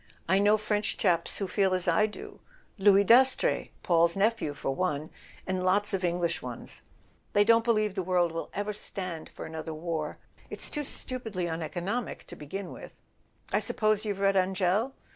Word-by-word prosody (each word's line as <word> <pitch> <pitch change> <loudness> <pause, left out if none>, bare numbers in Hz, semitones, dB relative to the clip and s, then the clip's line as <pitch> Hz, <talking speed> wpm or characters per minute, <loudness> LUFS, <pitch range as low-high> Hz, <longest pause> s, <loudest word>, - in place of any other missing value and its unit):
I 190 +3 +4
know 205 +2 +5
French 210 -1 -1
chaps 170 -1 +2
who 195 - -2
feel 190 0 +2
as 185 0 -1
I 175 +5 +4
do—Louis 205 - 0
Dastrey, 260 - +4
Paul's 170 0 +3
nephew, 200 -8 +1
for 135 - -2
one; 155 -2 -2 0.3
and 185 -1 -2
lots 200 +3 +2
of 190 -1 -1
English 175 -1 0
ones. - - -8 0.5
They 205 - +5
don't 230 +1 +5
believe 215 -3 +1
the 190 - -2
world 175 -2 +1
will 165 0 -5
ever 205 +1 -3
stand 185 -5 -5
for - - -9
another 160 0 -6
war. 160 -1 -3 0.3
It's - - -4
too 295 -1 -3
stupidly 225 -10 -3
uneco¬ 165 +1 -4
nomic, 230 +5 -3
to - - -11
begin 185 +5 -6
with: - - -10 0.6
I - - +4
suppose 215 -2 +1
you've 205 -3 -2
read 195 0 +3
Angell? 190 +6 +1
195 Hz, 170 wpm, -29 LUFS, 170-210 Hz, 0.6 s, know